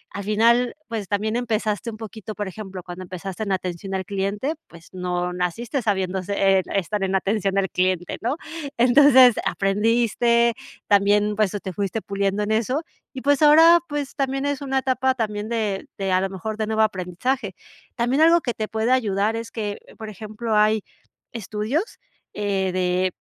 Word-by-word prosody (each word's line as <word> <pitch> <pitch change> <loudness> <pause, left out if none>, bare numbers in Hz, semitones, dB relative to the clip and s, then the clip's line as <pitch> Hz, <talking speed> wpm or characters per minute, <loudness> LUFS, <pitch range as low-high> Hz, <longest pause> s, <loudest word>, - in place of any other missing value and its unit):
Al 200 - -4
final, 235 +4 +3
pues, 220 -5 -4
también 215 +3 -1
empezaste 225 -2 -1
un 215 - -8
poquito 220 -1 -8
por 205 -2 -3
ejemplo, 190 -2 -8
cuando 175 +1 -8
empezaste 185 +2 -7
en 200 - -3
atención 185 +1 -3
al 190 -1 -3
cliente, 200 +9 -2
pues 170 -1 -16
no 180 -1 -2
naciste 225 - -2
sabiéndo 190 -3 -1
se 195 0 +2
e - - -2
estar 195 +2 -1
en 190 0 0
atención 195 0 0
al 190 -1 +1
cliente, 185 -1 0
¿no? 245 +6 0 0.4
Entonces 255 0 +7
aprendiste, 230 +3 +2 0.3
también, 205 +1 +3
pues, 210 -2 +1
o - - -2
te 190 -1 -6
fuiste 200 +3 -2
puliendo 200 +1 -1
en 210 - -2
eso. 250 +8 0 0.3
Y 260 - -6
pues 285 0 +2
ahora, 325 +3 +8
pues, 290 -2 -4
también 270 0 -1
es 285 -1 -2
una 270 -1 -1
etapa 260 0 +1
también 210 -2 -3
de 215 -4 -2
de 195 -1 -2
a 185 - +3
lo 195 - -1
mejor 210 +3 -5
de 215 -1 -2
nuevo 220 0 +2
aprendizaje. 200 +3 -2 0.4
También 250 +5 +1
algo 335 +1 +6
que 240 - -2
te 215 -1 -3
puede 220 +3 0
ayudar 215 -3 +1
es 230 0 -5
que, 210 -3 -4 0.2
por 220 -1 -6
ejemplo, 215 +2 -4
hay 215 0 +3 0.5
estudios, 230 - -3 0.4
eh, 195 -2 -1
de 185 0 0
210 Hz, 175 wpm, -23 LUFS, 195-235 Hz, 0.5 s, ahora